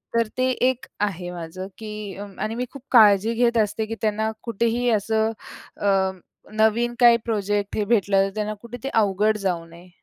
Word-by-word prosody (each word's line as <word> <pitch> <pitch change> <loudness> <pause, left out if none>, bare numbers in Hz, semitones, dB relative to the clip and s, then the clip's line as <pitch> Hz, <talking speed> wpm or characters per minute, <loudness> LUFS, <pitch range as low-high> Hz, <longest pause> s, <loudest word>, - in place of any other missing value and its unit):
तर 230 -1 +2
ते 255 - +2 0.2
एक 255 0 +1 0.2
आहे 185 -3 -2
माझं 175 +2 -7
की 210 -3 -7
उम्म 200 -2 -10
आणि 220 +1 -2
मी 250 +1 -2
खूप 275 - -10
काळजी 215 -1 +6
घेत 235 0 +2
असते 215 0 0
की 225 +1 -5
त्यांना 220 0 0
कुठेही 235 +2 0
असं 220 +1 +1 0.5
अ, 195 -2 +2 0.4
नवीन 220 +2 +2
काही 235 -1 +7
प्रोजेक्ट 205 -2 -1
हे 210 - 0
भेटलं 200 -3 +3
तर 195 - -9
त्यांना 215 0 -2
कुठे 235 +1 -8
ते 270 - -2
अवघड 210 +2 +1
जाऊ 180 -4 -2
नये. 170 +2 -15
215 Hz, 180 wpm, -23 LUFS, 195-230 Hz, 0.5 s, काही